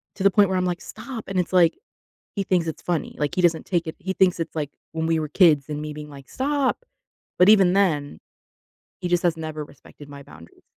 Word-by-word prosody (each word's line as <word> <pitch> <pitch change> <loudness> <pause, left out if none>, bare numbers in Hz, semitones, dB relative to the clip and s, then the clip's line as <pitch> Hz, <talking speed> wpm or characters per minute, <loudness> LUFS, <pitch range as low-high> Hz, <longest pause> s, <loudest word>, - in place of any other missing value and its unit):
to 190 - -4
the 195 - +5
point 200 -1 +4
where 190 - 0
I'm, 185 - 0
like, 175 0 -2
"Stop." 245 -5 -8
And 195 -1 -1
it's, 180 +1 -2
like, 175 -2 +4 0.6
he 200 - -1
thinks 180 -3 +1
it's 160 - -5
funny. 175 -3 -3
Like, 145 -1 -1
he 185 - +1
doesn't 170 -2 +2
take 175 -2 -1
it 160 - -5
he 190 - -3
thinks 185 -2 +2
it's 165 0 -4
like 145 -2 -3 0.2
when 160 0 -2
we 165 -1 +1
were 155 - -3
kids 155 -5 +4
and 150 0 -4
me 150 0 -5
being 150 0 -9
like, 140 -2 -13
"Stop." 280 - -1 0.6
But 180 - +6
even 195 -4 +6
then, 155 -8 0 0.8
he 180 - -2
just 175 0 +1
has 170 -2 +1
never 155 -1 -5
respected 145 0 -16
my 140 0 -10
boundaries. 85 - -16
170 Hz, 235 wpm, -23 LUFS, 150-190 Hz, 0.8 s, But